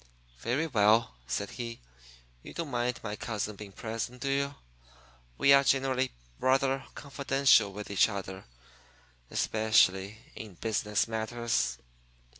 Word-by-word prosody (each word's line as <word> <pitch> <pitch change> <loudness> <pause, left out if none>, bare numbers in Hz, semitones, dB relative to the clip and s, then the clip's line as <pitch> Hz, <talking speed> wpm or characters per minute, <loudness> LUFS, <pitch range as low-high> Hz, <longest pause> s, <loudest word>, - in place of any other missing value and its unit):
"Very 130 - 0
well," 110 -4 +3
said 80 +11 -2
he. 115 -2 -6 0.6
"You - - -11
don't 165 -4 -4
mind 120 0 -1
my 105 -2 -4
cousin 105 -1 -4
being 100 0 -10
present, 115 +5 -5
do 135 +1 -1
you? 140 +1 0 0.8
We 140 - +6
are 140 0 +7
generally 130 -1 +1 0.3
rather 135 +1 +1
confidential 135 -6 +3
with 105 +1 -7
each 100 - +4
other 95 -2 -6 0.8
especially 105 -2 +2 0.2
in 105 -5 -9
business 105 +2 0
matters." 110 - -1
115 Hz, 120 wpm, -30 LUFS, 105-135 Hz, 0.8 s, are